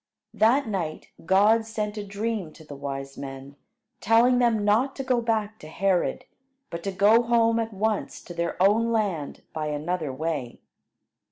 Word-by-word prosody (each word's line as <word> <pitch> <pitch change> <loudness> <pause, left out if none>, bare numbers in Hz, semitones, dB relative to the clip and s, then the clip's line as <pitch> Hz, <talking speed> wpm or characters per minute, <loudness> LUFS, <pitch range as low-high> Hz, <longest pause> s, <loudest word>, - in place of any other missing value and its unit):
That 230 +5 +3
night 175 -7 -4 0.2
God 210 +5 +4
sent 215 -1 -4
a 210 - -4
dream 205 -4 -4
to 160 - -15
the 150 - -9
wise 135 0 -6
men, 135 0 -8 0.4
telling 235 +3 +4
them 225 -4 +2
not 235 +7 +2
to 270 - -4
go 255 -2 +1
back 220 -2 -1
to 155 - -11
Herod, 185 +2 0 0.5
but 170 - -5
to 195 - -1
go 205 +5 +5
home 230 -1 +2
at 225 0 -2
once 215 +1 -2
to 175 - -9
their 170 0 -3
own 215 +5 +3
land 195 -10 -2
by 155 -1 -3
another 155 +1 -2
way. 140 -3 -4
205 Hz, 165 wpm, -25 LUFS, 160-225 Hz, 0.5 s, go